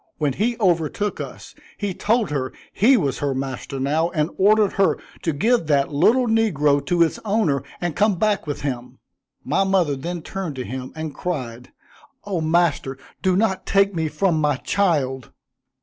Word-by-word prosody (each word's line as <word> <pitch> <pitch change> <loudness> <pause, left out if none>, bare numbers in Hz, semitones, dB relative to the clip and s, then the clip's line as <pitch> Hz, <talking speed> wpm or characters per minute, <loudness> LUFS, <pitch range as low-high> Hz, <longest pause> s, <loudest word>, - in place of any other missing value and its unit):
When 145 -3 0
he 230 - 0
overtook 180 +1 0
us, - - -9 0.2
he 205 -2 -2
told 220 -1 0
her 130 -3 -2 0.2
he 250 +6 +5
was 140 - -1
her 140 -2 -1
master 135 +1 -4
now, 155 +5 +1
and 155 -1 -1
ordered 210 +1 +4
her 195 -1 +2 0.2
to 165 - 0
give 190 +5 +1
that 145 -1 +2
little 245 - +4
negro 155 - +2
to 175 -1 +4
its 165 - -1
owner, 200 -10 +1 0.2
and 175 -4 -2
come 210 -1 +3
back 210 -3 0
with 145 - -4
him. 125 -3 -4 0.5
My - - +1
mother 185 -7 +2
then 170 +4 -5
turned 190 -7 -5
to 130 -1 -5
him 130 0 -6
and 160 -2 -5
cried, 125 -9 -5 0.5
"Oh, 190 -5 -2
master, 160 -4 +1 0.2
do 185 -1 +2
not 195 -1 0
take 200 0 +3
me 160 -2 -1
from 160 +1 0
my 150 -2 +2
child!" 135 -6 0
165 Hz, 170 wpm, -22 LUFS, 140-200 Hz, 0.5 s, he